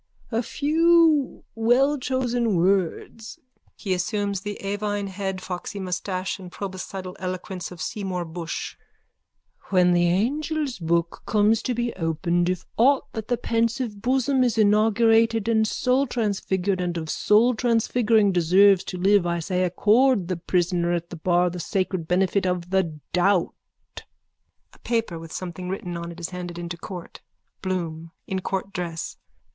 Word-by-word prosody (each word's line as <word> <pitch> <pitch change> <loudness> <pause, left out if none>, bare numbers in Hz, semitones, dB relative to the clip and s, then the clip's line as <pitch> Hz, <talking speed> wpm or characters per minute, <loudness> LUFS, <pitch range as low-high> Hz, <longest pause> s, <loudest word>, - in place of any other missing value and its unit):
A 225 +1 +1
few 315 +2 +3
wellchosen 245 -1 +1
words. 190 +4 0 0.4
(He 195 -4 -2
assumes 200 +1 -1
the 205 0 -5
avine 205 0 -2
head, 190 -1 -4
foxy 185 +2 -5
moustache 185 +1 -3
and 180 -2 -10
proboscidal 190 -1 -6
eloquence 185 -1 -5
of 180 - -11
Seymour 185 -4 -3
Bushe.) 165 0 -6 0.9
When 180 -2 +4
the 175 0 +3
angel's 280 - -1
book 170 0 -1
comes 215 +1 +3
to 250 - -2
be 240 0 -1
opened 170 +1 0
if 185 -2 -3
aught 265 +4 +3
that 220 -1 -5
the 245 - 0
pensive 230 -2 -1
bosom 265 +2 +2
has 245 -3 +1
inaugurated 225 +1 +3
of 230 - +2
soultransfigured 210 -8 0
and 175 -1 -2
of 160 - -3
soultransfiguring 225 0 +3
deserves 185 +3 +5
to 185 - -5
live 190 0 +3
I 170 0 0
say 180 +2 -1
accord 210 +3 +3
the 185 - -1
prisoner 175 0 0
at 170 0 -3
the - - -5
bar 175 +1 +2
the 180 - -6
sacred 185 -1 -2
benefit 190 +2 +1
of 180 0 -2
the 170 -5 0
doubt. 180 0 +2 1.2
(A - - -20
paper 225 -8 -2
with 165 -1 -10
something 180 0 -6
written 180 -2 -4
on 170 0 -5
it 170 - -11
is 170 - -4
handed 175 -1 -6
into 170 0 -5
court.) 175 0 -9 0.4
BLOOM: 165 -4 -3 0.2
_(In 190 -1 -2
court 195 +1 -3
dress.) 170 -2 -4
190 Hz, 140 wpm, -24 LUFS, 175-225 Hz, 1.2 s, deserves